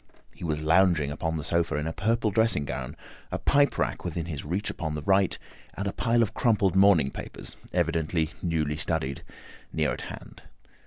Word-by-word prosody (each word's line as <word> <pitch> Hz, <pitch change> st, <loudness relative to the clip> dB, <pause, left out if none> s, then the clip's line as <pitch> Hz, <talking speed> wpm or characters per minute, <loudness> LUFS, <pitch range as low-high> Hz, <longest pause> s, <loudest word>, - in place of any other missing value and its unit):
He -, -, -12 dB
was 75 Hz, -3 st, -1 dB
lounging 80 Hz, -2 st, +3 dB
upon 80 Hz, +2 st, -2 dB
the 75 Hz, -, -4 dB
sofa 85 Hz, -1 st, 0 dB
in 75 Hz, 0 st, -1 dB
a 80 Hz, -, -2 dB
purple 110 Hz, +2 st, +1 dB
dressing 110 Hz, -8 st, +2 dB
gown, -, -, -5 dB, 0.4 s
a -, -, -1 dB
pipe 145 Hz, 0 st, +3 dB
rack -, -, -1 dB
within 85 Hz, -, -3 dB
his 75 Hz, -5 st, -5 dB
reach 90 Hz, +7 st, -2 dB
upon 80 Hz, -2 st, -4 dB
the 75 Hz, -, -5 dB
right, 95 Hz, +1 st, +3 dB, 0.4 s
and 100 Hz, -, -3 dB
a 100 Hz, -, -2 dB
pile 115 Hz, -1 st, +2 dB
of 110 Hz, -1 st, -3 dB
crumpled 105 Hz, -7 st, +2 dB
morning 95 Hz, -8 st, +5 dB
papers, -, -, -7 dB, 0.2 s
evidently 80 Hz, -2 st, 0 dB
newly 80 Hz, -4 st, 0 dB
studied, 80 Hz, -4 st, -1 dB, 0.5 s
near 80 Hz, -1 st, +1 dB
at -, -, -6 dB
hand. -, -, -9 dB
85 Hz, 180 wpm, -27 LUFS, 75-100 Hz, 0.5 s, morning